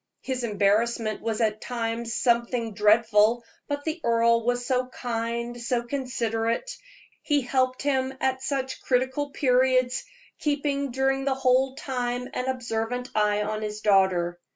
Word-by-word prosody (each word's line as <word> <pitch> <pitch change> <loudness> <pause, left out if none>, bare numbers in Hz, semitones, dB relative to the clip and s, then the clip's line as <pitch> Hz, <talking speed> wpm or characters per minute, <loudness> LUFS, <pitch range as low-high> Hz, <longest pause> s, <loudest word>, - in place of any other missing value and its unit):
His 255 -2 -3
embarrassment 215 +1 +1
was 225 0 -2
at 215 -1 0
times 230 -1 -3
something 235 -2 +1
dreadful, 215 +2 +4 0.2
but 285 0 -3
the 320 +2 -3
earl 230 0 +3
was 245 +1 0
so 250 0 0
kind, 235 -1 -4
so 240 0 0
considerate; 240 - -2 0.5
he 290 -2 +1
helped 255 0 0
him 265 -2 +1
at 260 0 0
such 265 -1 -3
critical 260 +3 0
periods, 255 -2 +2 0.4
keeping 285 -1 -1
during 270 +2 0
the 270 -1 +1
whole 260 0 +2
time 250 -2 -3
an 250 - -2
observant 245 0 -3
eye 210 -1 +2
on 215 +1 -3
his 210 0 -4
daughter. 190 -4 +2
245 Hz, 135 wpm, -26 LUFS, 225-260 Hz, 0.5 s, dreadful